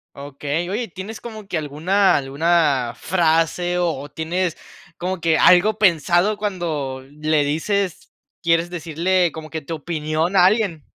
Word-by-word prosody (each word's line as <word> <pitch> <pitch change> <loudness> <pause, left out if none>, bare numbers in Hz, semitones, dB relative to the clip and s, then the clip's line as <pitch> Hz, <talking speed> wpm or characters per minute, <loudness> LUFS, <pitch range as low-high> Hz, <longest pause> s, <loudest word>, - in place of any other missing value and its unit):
Okey. 145 +4 -4
Oye, 225 +1 -3
¿tienes 190 +5 -8
como 215 -4 -9
que 175 - -2
alguna 160 +7 +2
alguna 140 -3 +1
frase, 175 0 +1
o 150 -5 -2
tienes 170 +3 -2 0.4
como 185 0 -3
que 160 -1 +2
algo 200 +4 +5
pensado, 175 +2 +3
cuando 160 -10 -3
le 150 0 0
dices 180 +5 -2 0.3
quieres 165 +1 +2
decirle 175 +1 0
como 155 -1 -9
que 160 -1 -5
tu 165 +3 -5
opinión 155 +3 -2
a 180 -1 +6
alguien? 195 - 0
170 Hz, 135 wpm, -21 LUFS, 155-185 Hz, 0.4 s, a